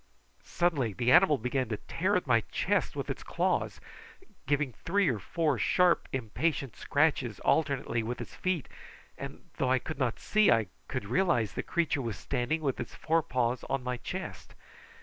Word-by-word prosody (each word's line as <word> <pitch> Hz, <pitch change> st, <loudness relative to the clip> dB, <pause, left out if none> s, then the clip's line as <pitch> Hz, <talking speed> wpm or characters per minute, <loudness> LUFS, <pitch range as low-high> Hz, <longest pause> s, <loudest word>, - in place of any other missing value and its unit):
Suddenly 145 Hz, -, 0 dB
the 120 Hz, +4 st, +1 dB
animal 165 Hz, -1 st, +6 dB
began 125 Hz, 0 st, -1 dB
to 105 Hz, -, -2 dB
tear 190 Hz, -, -1 dB
at 180 Hz, -, +1 dB
my 115 Hz, -4 st, +4 dB
chest -, -, 0 dB
with -, -, -3 dB
its -, -, -4 dB
claws, -, -, -1 dB, 0.7 s
giving 145 Hz, -2 st, +1 dB
three 195 Hz, -, +1 dB
or 115 Hz, -5 st, -1 dB
four 150 Hz, -, 0 dB
sharp 180 Hz, -1 st, +3 dB
impatient 135 Hz, +3 st, -1 dB
scratchings 140 Hz, -7 st, +1 dB
alternately 140 Hz, -6 st, +1 dB
with 120 Hz, +2 st, -4 dB
its -, -, -7 dB
feet, 185 Hz, -6 st, -1 dB, 0.5 s
and -, -, -8 dB
though 130 Hz, -, +1 dB
I 130 Hz, -, +4 dB
could 155 Hz, +5 st, -6 dB
not 125 Hz, -4 st, 0 dB
see, 215 Hz, 0 st, +3 dB
I 115 Hz, -5 st, +3 dB, 0.2 s
could -, -, -3 dB
realise 120 Hz, -, +2 dB
that -, -, -18 dB
the -, -, -18 dB
creature 165 Hz, -5 st, +1 dB
was 115 Hz, -5 st, -4 dB
standing 135 Hz, +4 st, -1 dB
with 135 Hz, -3 st, -1 dB
its 120 Hz, -, -6 dB
forepaws 130 Hz, -7 st, 0 dB
on 135 Hz, -2 st, -2 dB
my 125 Hz, 0 st, -2 dB
chest. -, -, -7 dB
135 Hz, 170 wpm, -30 LUFS, 120-160 Hz, 0.7 s, animal